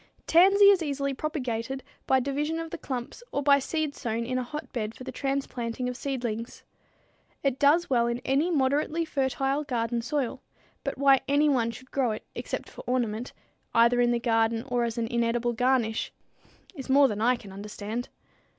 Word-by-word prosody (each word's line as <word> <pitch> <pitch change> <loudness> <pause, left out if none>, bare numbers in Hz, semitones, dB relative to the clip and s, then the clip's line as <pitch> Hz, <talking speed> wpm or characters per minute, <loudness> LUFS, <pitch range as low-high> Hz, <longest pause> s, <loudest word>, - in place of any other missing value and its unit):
Tansy 390 +4 +7
is 385 -3 +3
easily 280 -2 -1
propagated 265 -3 -3 0.2
by 265 - +4
division 290 +5 -1
of 330 -1 -5
the - - -4
clumps 255 - -5
or 285 - -1
by 280 0 +6
seed 310 +1 -2
sown 230 -3 -3
in 255 +1 -1
a - - -2
hotbed 240 -5 -5
for - - -10
the 260 - -6
transplanting 255 -3 -3
of 250 - -3
seedlings. 240 -4 -4 0.8
It 270 -1 0
does 305 +5 +4
well 235 -3 +2
in 235 0 -1
any 280 +6 +2
moderately 300 +2 +1
fertile 275 -1 0
garden 235 -3 -1
soil, 270 0 -2 0.4
but - - -3
why 275 -1 +5
anyone 280 -5 +3
should 255 +3 -10
grow 255 -5 +1
it 215 - -7
except - - -5
for - - -11
ornament, 240 -2 -1 0.4
either 235 +1 +5
in 240 - +3
the 240 0 +1
garden 225 -1 +1
or 245 -1 +1
as 230 0 -4
an 230 - 0
inedible 235 +1 0
garnish, 245 -2 +1 0.6
is 270 -6 -8
more 275 +1 +6
than 210 -3 -3
I 245 +3 +4
can 210 -5 -11
understand. 210 +4 -5
255 Hz, 175 wpm, -27 LUFS, 235-280 Hz, 0.8 s, Tansy